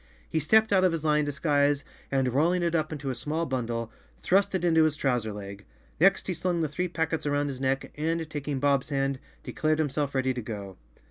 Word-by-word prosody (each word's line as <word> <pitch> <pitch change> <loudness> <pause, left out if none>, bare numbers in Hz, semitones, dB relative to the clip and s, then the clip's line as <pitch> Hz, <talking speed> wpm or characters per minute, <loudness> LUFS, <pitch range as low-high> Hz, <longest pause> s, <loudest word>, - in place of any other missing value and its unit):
fHe 160 - +2
stepped 220 +7 +4
out 190 -1 +4
of 185 - +4
his 165 -2 -3
lion 150 -1 +3
disguise 145 0 +1 0.3
and, 130 -2 +1
rolling 170 +6 +2
it 170 -1 0
up 155 -1 0
into 145 -3 -3
a - - -2
small 155 +7 -2
bundle, 115 -4 -3 0.3
thrust 195 +1 +2
it 180 -1 0
into 160 -2 +5
his 155 -1 +1
trouser 125 -6 0
leg. 100 -1 -8 0.4
Next 195 +4 +4
he 185 - -1
slung 175 0 -1
the 160 - +1
three 180 +5 -2
packets 160 -2 -2
around 145 0 +1
his 130 -1 -6
neck 135 0 -1
and, 160 +2 -1
taking 145 -3 -3
Bob's 140 -1 +2
hand, 135 -2 0 0.2
de, - - -6
dared 155 0 +1
himself 145 -2 -1
ready 130 0 +1
to 125 - -4
go. 100 -4 -7
145 Hz, 215 wpm, -27 LUFS, 135-165 Hz, 0.4 s, into